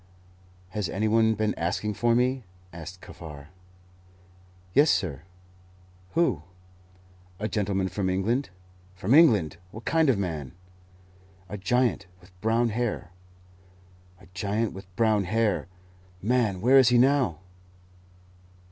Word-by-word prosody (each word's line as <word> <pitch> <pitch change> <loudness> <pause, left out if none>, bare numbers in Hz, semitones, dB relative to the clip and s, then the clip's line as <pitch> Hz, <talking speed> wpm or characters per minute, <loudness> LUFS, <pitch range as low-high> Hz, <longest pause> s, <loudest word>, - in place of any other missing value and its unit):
"Has 95 -1 -3
any 105 +3 -1
one 110 0 +3
been 110 0 0
asking 90 +5 -1
for 120 +3 +2
me?" 125 +1 +1 0.3
asked 85 +2 -9
Kaffar. 75 -3 -11 1.2
"Yes, 145 +6 +5
sir." 80 - 0 0.9
"Who?" 165 - +2 1.0
"A 105 - -1
gentleman 100 -2 -1
from 95 +1 -2
England." 110 +8 0 0.5
"From 95 +6 0
England! 110 - +5
What 110 +4 -11
kind 160 -3 +3
of 130 - +4
a - - -4
man?" 80 -9 -4 1.0
"A 105 - -5
giant, 110 0 +1
with 90 +1 -20
brown 115 +2 +2
hair." 115 -5 -3 1.1
"A - - -17
giant, 105 +4 -1
with 95 0 -10
brown 110 -3 +2
hair! 105 -1 0 0.5
Man, 110 -3 0
where 130 +4 +6
is 130 -2 +6
he 125 - +4
now?" 130 - +3
105 Hz, 120 wpm, -26 LUFS, 95-120 Hz, 1.2 s, where